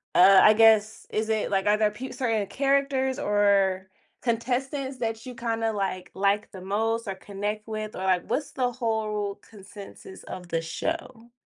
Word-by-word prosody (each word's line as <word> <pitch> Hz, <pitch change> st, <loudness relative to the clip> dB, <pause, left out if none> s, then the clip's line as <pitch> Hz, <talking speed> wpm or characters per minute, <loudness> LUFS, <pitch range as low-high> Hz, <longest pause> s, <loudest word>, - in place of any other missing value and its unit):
uh, 190 Hz, +1 st, +8 dB
I 215 Hz, -, +8 dB
guess, 220 Hz, -1 st, +4 dB
is 215 Hz, +1 st, -1 dB
it, 220 Hz, -2 st, 0 dB
like 195 Hz, +1 st, +1 dB
are 210 Hz, +1 st, +4 dB
there 215 Hz, -1 st, +2 dB
pe 255 Hz, +5 st, -7 dB
certain 225 Hz, -6 st, -1 dB
characters 275 Hz, -1 st, +1 dB
or 200 Hz, -2 st, +2 dB, 0.3 s
contestants 260 Hz, +3 st, -2 dB
that 225 Hz, 0 st, -3 dB
you 250 Hz, -, -7 dB
kinda, 225 Hz, -2 st, -1 dB
like, 190 Hz, -2 st, -3 dB
like 200 Hz, +2 st, +1 dB
the 190 Hz, -, -10 dB
most 225 Hz, +3 st, -1 dB
or 195 Hz, -, -3 dB
connect 205 Hz, +2 st, -5 dB
with? 215 Hz, -1 st, -5 dB
Or, 190 Hz, -, -5 dB
like, 185 Hz, -2 st, +1 dB
what's 290 Hz, 0 st, -2 dB
the 250 Hz, -2 st, 0 dB
whole 215 Hz, -4 st, -2 dB
consensus 200 Hz, -2 st, -12 dB
of 180 Hz, -1 st, -8 dB
the 165 Hz, 0 st, 0 dB
show? 240 Hz, -, -5 dB
215 Hz, 170 wpm, -26 LUFS, 200-235 Hz, 0.3 s, uh